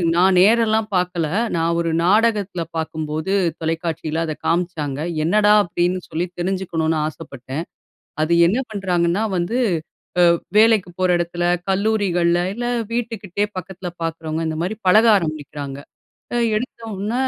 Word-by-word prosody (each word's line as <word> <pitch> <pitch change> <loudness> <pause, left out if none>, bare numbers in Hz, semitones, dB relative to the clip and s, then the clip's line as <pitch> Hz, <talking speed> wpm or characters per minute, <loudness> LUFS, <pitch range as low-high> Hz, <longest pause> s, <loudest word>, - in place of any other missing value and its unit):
நான் 185 +1 +4
நேரெல்லாம் 220 +1 +3
பாக்கல. 180 -3 0 0.3
நான் 170 0 +1
ஒரு 170 -1 0
நாடகத்தில 205 -2 +2
பாக்கும்போது, 160 +2 -3 0.3
தொலைக்காட்சியில 160 0 -2
அத 155 - -3
காமிச்சாங்க. 165 -5 -1 0.2
என்னடா, 205 +5 +4
அப்படின்னு 175 +1 0
சொல்லி 170 +3 -2
தெரிஞ்சுக்கணுனு 175 -3 -1
ஆசப்பட்டேன். 145 -1 -7 0.6
அது 155 - +1 0.2
என்ன 215 +8 +1
பண்றாங்கன்னா 180 -1 0
வந்து, 180 +8 -1 0.8
அ - - +3 0.2
வேலைக்கு 215 -5 +4
போற 185 - +2
எடத்துல, 175 0 -2 0.3
கல்லூரிகள்ல, 190 -4 +1
இல்ல 240 0 -3 0.3
வீட்டுகிட்டேயே 210 -4 -2
பக்கத்துல 185 0 -6
பாக்கிறவங்க, 160 0 -3
இந்த 155 - -4
மாரி 210 +4 -3
பழக 215 +5 +6
ஆரம்பிக்கிறாங்க. 145 -4 -5 0.6
அ, - - +1 0.2
எடுத்தோன, 220 -3 -4
175 Hz, 120 wpm, -21 LUFS, 165-205 Hz, 0.8 s, பழக